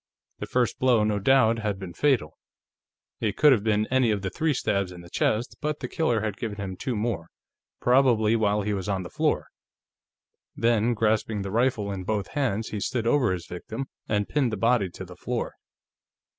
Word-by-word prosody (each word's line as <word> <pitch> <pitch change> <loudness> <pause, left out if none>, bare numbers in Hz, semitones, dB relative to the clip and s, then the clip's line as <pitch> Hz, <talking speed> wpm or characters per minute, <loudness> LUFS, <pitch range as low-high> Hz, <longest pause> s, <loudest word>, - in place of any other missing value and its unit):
The - - -5
first 125 -2 0
blow, 125 -4 +4
no 105 -1 +1
doubt, 115 0 +4
had 105 -3 -2
been 95 -3 -8
fatal 135 - +1 0.8
it 105 -3 -1
could 150 -1 +6
have 115 -6 +3
been 105 -1 +2
any 130 -3 +3
of 105 -2 0
the 95 - -2
three 160 +9 0
stabs 100 -5 0
in 90 -1 -10
the 85 - -14
chest 110 +3 0
but 150 0 -2
the - - -4
killer 120 -10 0
had 105 -2 -3
given 110 -3 -4
him 95 -2 -5
two 125 +5 -3
more, 105 -6 -2 0.5
probably 120 -4 +4
while 105 -2 +1
he 105 +1 -1
was 95 0 -3
on 95 -2 -1
the 90 - -9
floor. - - 0 1.1
Then, 115 0 +2
grasping 110 -1 0
the 95 - -5
rifle 115 -3 +1
in 95 -2 -4
both 100 0 -2
hands, 120 -7 -1
he 110 - -4
had 100 - -2
stood 120 -3 -2
over 125 -3 +3
his 90 -2 -3
victim 110 +9 -6 0.2
and 105 -1 +1
pinned 135 -5 +1
the 110 - -2
body 115 -2 +2
to - - -9
the - - -12
floor. - - -3
110 Hz, 200 wpm, -26 LUFS, 100-120 Hz, 1.1 s, could